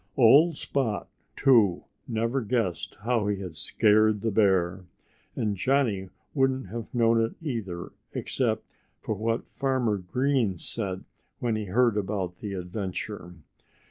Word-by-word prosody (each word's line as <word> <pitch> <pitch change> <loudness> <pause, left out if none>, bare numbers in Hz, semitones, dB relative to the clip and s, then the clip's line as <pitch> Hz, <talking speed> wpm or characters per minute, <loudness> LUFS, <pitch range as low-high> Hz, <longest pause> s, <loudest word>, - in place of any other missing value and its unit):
Old 145 +6 +6
Spot, 120 -7 -1 0.3
too, 115 -10 +4 0.2
never 115 +4 0
guessed 115 -6 -2
how 115 -1 +1
he 100 -1 0
had 90 -4 -6
scared 105 +5 +3
the 115 - 0
bear. 95 -3 +2 0.5
And 105 -2 -1
Johnnie 110 -4 +1 0.2
wouldn't 135 -6 +1
have 115 +2 -6
known 115 -1 +3
it, 115 - -3
either, 110 - -4 0.2
except 110 -4 -2 0.3
for - - -3
what 115 +3 -2
Farmer 130 -7 0
Green 120 +1 0
said 95 +1 -4 0.3
when 115 -2 -1
he 110 -1 -2
heard 115 +3 +2
about 95 -3 -2
the 100 -1 -5
adventure. 90 0 -5
110 Hz, 130 wpm, -27 LUFS, 95-120 Hz, 0.5 s, Old